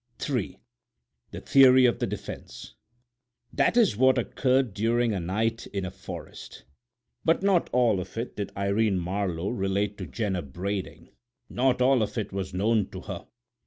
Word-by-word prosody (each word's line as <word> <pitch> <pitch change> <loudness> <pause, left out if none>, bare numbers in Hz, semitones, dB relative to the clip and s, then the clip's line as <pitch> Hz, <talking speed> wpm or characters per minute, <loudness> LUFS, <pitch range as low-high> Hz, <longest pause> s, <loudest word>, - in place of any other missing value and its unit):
III 125 -9 -2 0.7
THE - - -8
THEORY 130 -1 +6
OF 120 - +2
THE - - 0
DEFENSE - - -8 0.8
That - - +2
is 225 - +4
what 130 +3 +4
occurred 130 -4 +1
during 115 +2 +1
a 95 - -1
night 110 +6 -2
in 100 -2 -4
a 95 - -5
forest, 95 - -10 0.6
but 165 +3 +2
not 195 -3 +2
all 120 -5 +3
of 90 +4 -8
it 115 +2 -4
did 100 -1 -4
Irene 100 +1 +1
Marlowe 90 0 -2
relate 100 -1 -1
to 95 - -5
Jenner 100 -6 -2
Brading; 95 +7 -5 0.4
not 125 0 +2
all 130 -1 +4
of 110 +3 -2
it 105 -3 -3
was 95 -1 -3
known 105 +3 +1
to - - -8
her. - - -7
105 Hz, 160 wpm, -27 LUFS, 95-125 Hz, 0.8 s, THEORY